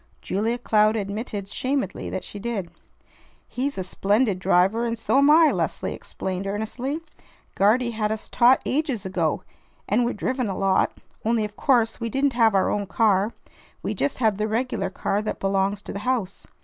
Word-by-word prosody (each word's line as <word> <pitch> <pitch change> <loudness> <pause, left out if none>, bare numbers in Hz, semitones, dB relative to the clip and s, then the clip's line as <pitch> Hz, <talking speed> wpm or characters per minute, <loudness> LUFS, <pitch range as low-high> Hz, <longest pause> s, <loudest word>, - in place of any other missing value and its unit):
Julia 225 +5 -1
Cloud 215 -2 +3
admitted 205 0 -4
shamedly 255 -2 -2
that 190 - -4
she 205 - -8
did. 205 -5 -3 0.8
"He's 275 +3 -3
a 190 - -2
splendid 200 +2 +1
driver, 195 +4 +3
and 230 -1 -1
so 225 +4 +2
am 280 +1 +5
I," 315 0 +7
Leslie - - -2
explained 190 +1 -5
earnestly. 240 +9 -3 0.5
"Guardy 235 +5 +3
had 215 -2 -1
us 220 0 -4
taught 245 +2 +4
ages 270 -8 -1
ago, 175 -5 -1 0.4
and 220 +4 +2
we're 240 - 0
driven 250 +2 -2
a 190 - -3
lot; 195 -1 +1 0.3
only 225 -1 +1
of 210 0 -9
course 235 -5 +2
we 230 -1 -2
didn't 270 +3 +1
have 225 -3 +4
our 190 - +3
own 205 -1 -1
car. 210 0 +2 0.5
We - - -1
just 285 - -1
had 220 -5 +1
the 215 - +1
regular 220 -3 -1
car 200 +2 -1
that 215 - -4
belongs 195 +1 0
to - - -7
the 200 - -4
house. 210 -4 -2
215 Hz, 175 wpm, -24 LUFS, 195-245 Hz, 0.8 s, I